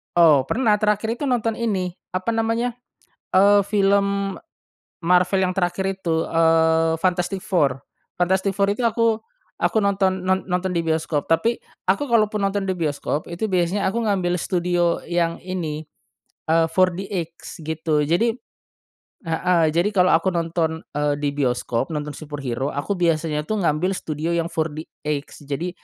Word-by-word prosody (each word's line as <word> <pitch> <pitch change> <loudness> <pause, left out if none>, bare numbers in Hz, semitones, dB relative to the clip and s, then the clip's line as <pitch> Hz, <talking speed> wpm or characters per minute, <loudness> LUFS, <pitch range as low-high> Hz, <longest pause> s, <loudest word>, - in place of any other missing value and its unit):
Oh, 150 -6 +5
pernah 220 -4 +2
terakhir 215 +2 0
itu 290 - -1
nonton 230 -3 0
ini 190 -6 -1 0.2
apa 185 +5 -1
namanya, 225 +2 0 0.6
eee, 200 +2 +6
film 200 -1 +1 0.7
Marvel 180 +2 +3
yang 185 - +1
terakhir 180 0 -1 0.2
itu, 165 -2 0
eee, 160 0 +3
Fantastic 185 +1 0
4. 140 -9 +1 0.3
Fantastic 190 +2 +1
4 200 0 +2
itu 205 - -4
aku, 230 -1 +1 0.4
aku - - +1
nonton, 190 -2 +1
non 190 +1 0
nonton 180 +1 -1
di 170 - 0
bioskop, 160 -2 -1
tapi 165 +9 +2 0.2
aku 200 +10 +1
kalaupun 215 -3 +2
nonton 200 0 -1
di 190 - -1
bioskop 150 -1 -2
itu 185 +5 -3
biasanya 185 +2 +1
aku 230 0 -1
ngambil 180 -3 +1
studio 175 -1 0
yang 170 -1 0
ini, 160 -5 -4 0.6
eee, 165 0 +3
4DX 185 -2 -1
gitu 155 -2 0
jadi 225 +9 +1 0.9
heeh 165 0 +2
jadi 175 +4 +3
kalau 180 0 +5
aku 165 +3 +2
nonton, 165 -1 -1
eee, 145 0 +1
di 145 -1 -1
bioskop 125 -2 -1
nonton 150 -1 -3
superhero 140 -4 -4
aku 145 +8 -2
biasanya 160 -3 0
tuh 215 +7 -2
ngambil 170 +1 +1
studio 155 +2 -3
yang 165 0 0
4DX 150 -2 -4
jadi 170 +6 -2
175 Hz, 145 wpm, -22 LUFS, 160-200 Hz, 0.9 s, eee